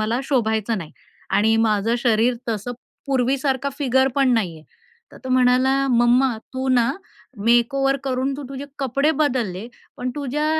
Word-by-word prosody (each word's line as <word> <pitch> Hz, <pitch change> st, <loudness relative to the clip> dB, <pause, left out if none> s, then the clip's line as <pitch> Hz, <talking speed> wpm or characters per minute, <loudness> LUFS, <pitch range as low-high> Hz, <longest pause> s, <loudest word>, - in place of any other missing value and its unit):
मला 225 Hz, +4 st, 0 dB
शोभायचं 220 Hz, -5 st, 0 dB
नाही" 155 Hz, -4 st, -9 dB, 0.4 s
आणि 220 Hz, +2 st, +3 dB
माझं 215 Hz, +2 st, +1 dB
शरीर 235 Hz, 0 st, +2 dB
तसं 225 Hz, +2 st, -3 dB, 0.3 s
पूर्वीसारखा 265 Hz, +1 st, 0 dB
फिगर 265 Hz, -1 st, +2 dB
पण 270 Hz, -2 st, +3 dB
नाहीये. 170 Hz, -8 st, -2 dB, 0.5 s
तर -, -, -13 dB
तो -, -, -5 dB
म्हणाला, 255 Hz, +1 st, +3 dB, 0.2 s
"मम्मा 240 Hz, +1 st, +3 dB, 0.2 s
तू 260 Hz, 0 st, -2 dB
ना 245 Hz, -2 st, +3 dB, 0.5 s
मेकओव्हर 270 Hz, +4 st, +3 dB
करून 265 Hz, 0 st, -1 dB
तू 290 Hz, -, -7 dB
तुझे 275 Hz, 0 st, -6 dB
कपडे 275 Hz, +3 st, +1 dB
बदलले, 235 Hz, -9 st, -1 dB, 0.3 s
पण 250 Hz, 0 st, -3 dB
तुझ्या 290 Hz, +2 st, -2 dB
250 Hz, 140 wpm, -21 LUFS, 230-270 Hz, 0.5 s, आणि